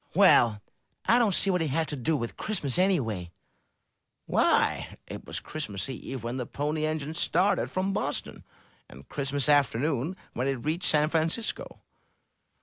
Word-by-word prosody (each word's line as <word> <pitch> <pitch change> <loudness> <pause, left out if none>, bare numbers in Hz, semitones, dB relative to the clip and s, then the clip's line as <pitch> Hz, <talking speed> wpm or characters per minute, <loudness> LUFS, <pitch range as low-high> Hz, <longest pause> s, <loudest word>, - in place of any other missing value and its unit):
"Well, 105 -3 +5 0.4
I 235 - +5
don't 215 -6 +2
see 195 - +4
what 180 -2 +1
it 160 - 0
had 160 +3 0
to 150 - -3
do 150 +4 0
with 115 -3 -5
Christmas, 175 - 0
anyway." 115 - +1 1.0
"Why, - - +1
it - - -8
was - - -4
Christmas 120 -11 -5
Eve 130 -1 -6
when 120 +2 -3
the 125 -2 -4
Pony 150 +2 -2
Engine 155 -1 -3
started 185 +4 +1
from 190 +1 -1
Boston, - - -3 0.5
and 65 +1 -14
Christmas 140 -1 0
afternoon 145 +2 +2 0.2
when 125 +2 -1
it 135 - +1
reached 165 +4 0
San 150 0 +3
Francisco." 165 +8 -2
150 Hz, 150 wpm, -28 LUFS, 130-165 Hz, 1.0 s, Well